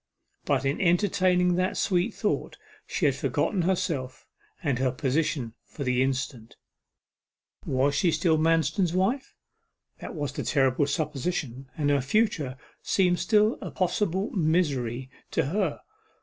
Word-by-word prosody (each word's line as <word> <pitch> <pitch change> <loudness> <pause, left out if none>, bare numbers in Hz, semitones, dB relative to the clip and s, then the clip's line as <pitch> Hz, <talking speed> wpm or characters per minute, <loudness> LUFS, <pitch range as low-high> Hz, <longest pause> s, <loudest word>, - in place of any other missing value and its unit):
But, - - +1
in 135 +2 0
entertaining 180 0 +3
that 185 +1 0
sweet 185 +4 +1
thought, 210 - -2 0.3
she - - -1
had - - +4
forgotten 195 - 0
herself, 170 -8 -2 0.4
and 140 -6 0
her 130 -1 +2
position 130 -2 -1
for 145 - -7
the 125 -1 +1
instant. 130 -3 -2 1.1
Was 135 +2 +2
she 170 +4 +2
still 160 0 +2
Manston's 165 +3 +2
wife 230 +10 0 0.6
that - - -7
was 145 -3 -2
the - - -3
terrible 135 0 +2
supposition, 145 -3 -3
and 145 -2 +1
her 140 -1 +3
future 150 - 0 0.2
seemed 180 -2 +2
still 215 0 +3
a - - -5
possible 190 +1 -1
misery 140 - 0 0.2
to - - 0
her. 175 +1 -1
160 Hz, 135 wpm, -27 LUFS, 135-185 Hz, 1.1 s, had